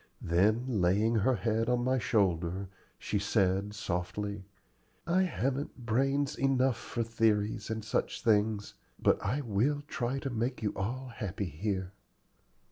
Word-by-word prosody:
Then, 100 +8 +3 0.2
laying 100 +6 +3
her 125 +5 +3
head 115 0 0
on 125 0 +2
my 130 +1 +2
shoulder, 95 -4 +1 0.3
she 105 - -1
said, 100 0 +1
softly, 100 +1 -3 0.6
"I 175 +2 +3
haven't 135 -7 -2
brains 135 +5 +1
enough 135 -2 +2
for 120 - -3
theories 110 -2 +1
and 110 -1 -3
such - - -1
things, 105 -2 +2 0.3
but - - +2
I 130 +9 0
will 135 +5 0
try 130 -3 -2
to 135 0 -3
make 120 +1 -2
you 105 - 0
all 125 +7 -3
happy 100 -4 -4
here." 95 +3 -2
110 Hz, 135 wpm, -31 LUFS, 100-130 Hz, 0.6 s, Then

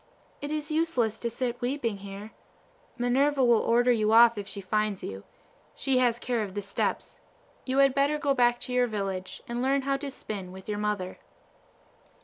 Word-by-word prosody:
It 290 - -4
is 305 0 -3
useless 285 -9 0
to 235 - -2
sit 245 +1 -3
weeping 245 -4 -1
here. 200 +2 -9 0.7
Minerva 265 +3 +2
will 240 -2 +5
order 240 +2 +3
you 215 -2 +2
off 235 0 +7
if 205 -2 -6
she 200 - -7
finds 210 +1 -1
you. 95 0 -6 0.5
She 265 -2 +1
has 240 -2 +3
the - - -12
care 240 -2 0
of 200 -2 -5
the 205 - -2
steps. 195 - -2 0.5
You 260 0 -1
had 275 -1 +5
better 280 +2 +2
go 290 -2 +1
back 240 -2 +3
to 250 - -4
your 250 0 +3
village 195 -4 -4
and 235 +1 -3
learn 270 +2 +2
to 275 +1 -1
spin 200 -8 -7
with 190 0 -11
your 210 -1 -2
mother." 210 -3 -2
240 Hz, 185 wpm, -28 LUFS, 210-270 Hz, 0.7 s, off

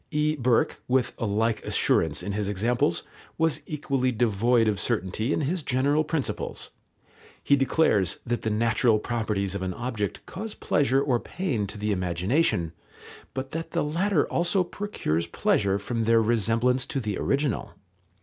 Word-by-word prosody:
E. 150 -1 +1
Burke, 125 -4 +1
with 130 0 +1
a 115 - -1
like 110 +2 0
assurance 80 +1 +1
in 100 - -3
his 100 0 -2
examples, 105 -2 0 0.3
was 160 -1 +1
equally 135 -4 0
devoid 115 0 +2
of 105 -2 0
certainty 110 +2 -1
in - - +1
his 165 +5 -1
general 140 +3 +2
principles. 155 -3 -3 0.7
He 140 - +4
declares 135 - +2
that 120 0 -1
the 110 - -1
natural 110 +1 +2
properties 105 -4 -2
of 100 - -4
an 95 -1 -3
object 115 -5 -3
cause 210 +4 -6
pleasure 135 -1 +2
or 130 -4 +1
pain 130 - -2
to 105 - -8
the 105 +1 -1
imagination, 90 - 0 0.6
but 135 +1 -4
that 165 +1 -5
the - - +1
latter 170 +2 +1
also 175 +2 +1
procures 175 - -2
pleasure 100 0 +1
from 115 +3 -2
their 115 0 +5
resemblance 115 +3 +2
to 135 - -2
the 105 -5 -3
original. 140 -4 -1
120 Hz, 155 wpm, -26 LUFS, 105-140 Hz, 0.7 s, their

